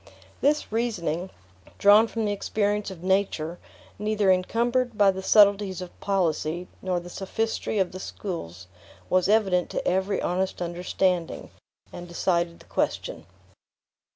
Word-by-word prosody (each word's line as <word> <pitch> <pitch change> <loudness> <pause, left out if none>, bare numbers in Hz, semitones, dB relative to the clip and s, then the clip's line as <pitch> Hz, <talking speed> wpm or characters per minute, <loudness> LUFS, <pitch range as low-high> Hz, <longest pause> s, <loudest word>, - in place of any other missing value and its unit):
This 295 -3 +1
reasoning, 190 -7 -1 0.5
drawn 210 +3 +6
from 225 -1 -2
the 205 - 0
experience 205 0 -1
of 180 -3 -10
nature, 185 -3 0 0.4
neither 210 -2 +2
encumbered 235 +5 +1
by 200 -1 +6
the 190 0 -6
subtleties 200 -1 +4
of 180 -1 -9
policy 175 -3 -1
nor 185 -2 -1
the 175 - -11
sophistry 210 +4 -2
of 190 -2 +1
the 185 - -7
schools, 95 - -6 0.5
was 185 +1 +3
evident 195 -5 +3
to - - -3
every 190 +2 +1
honest 185 +2 -1
understanding, 180 0 -1 0.4
and 175 0 -8
decided 170 -1 0
the - - -17
question. 80 -1 -2
190 Hz, 130 wpm, -26 LUFS, 175-210 Hz, 0.5 s, drawn